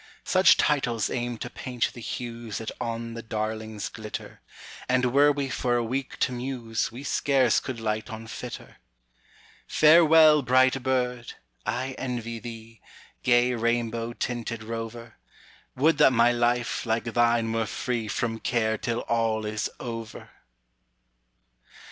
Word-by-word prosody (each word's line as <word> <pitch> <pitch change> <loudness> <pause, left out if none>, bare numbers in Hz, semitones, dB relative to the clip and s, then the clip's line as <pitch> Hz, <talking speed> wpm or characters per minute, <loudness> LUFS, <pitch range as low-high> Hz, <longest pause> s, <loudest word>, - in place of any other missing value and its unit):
Such 185 0 +5
titles 125 -7 +1
aim 120 -1 -2
to 120 - -6
paint 125 -3 -2
the 120 - -10
huesThat 115 -2 -5
on 115 0 -4
the 115 - -6
darlings 110 -1 -4
glitter, 110 -1 -8 0.5
And 125 -1 +2
were 145 +1 +6
we 140 -1 -2
for 125 -2 0
a 120 - +1
week 130 +3 -3
to - - +2
muse, 120 -3 -3
We 125 +4 -9
scarce 135 -2 +2
could 130 -3 -6
light 110 0 -2
on 110 0 -7
fitter. 120 +2 -8 0.9
Farewell, 155 -1 +6
bright 130 +1 +3
bird! 125 -2 -1 0.3
I 130 +1 -1
envy 120 -3 -4
thee, 115 -1 -10 0.4
Gay 120 0 +3
rainbow 115 0 -1
tinted 115 -2 -4
rover; 115 +1 -7 0.6
Would 155 +5 +3
that 130 - +6
my 120 0 +5
life, 120 0 0
like 115 -1 0
thine, 115 -1 +1
were 115 -1 0
freeFrom 115 0 -2
care 110 -2 0
till 120 -1 -2
all 115 -2 0
is 105 0 -2
over! 115 -2 -7
120 Hz, 130 wpm, -26 LUFS, 115-125 Hz, 0.9 s, were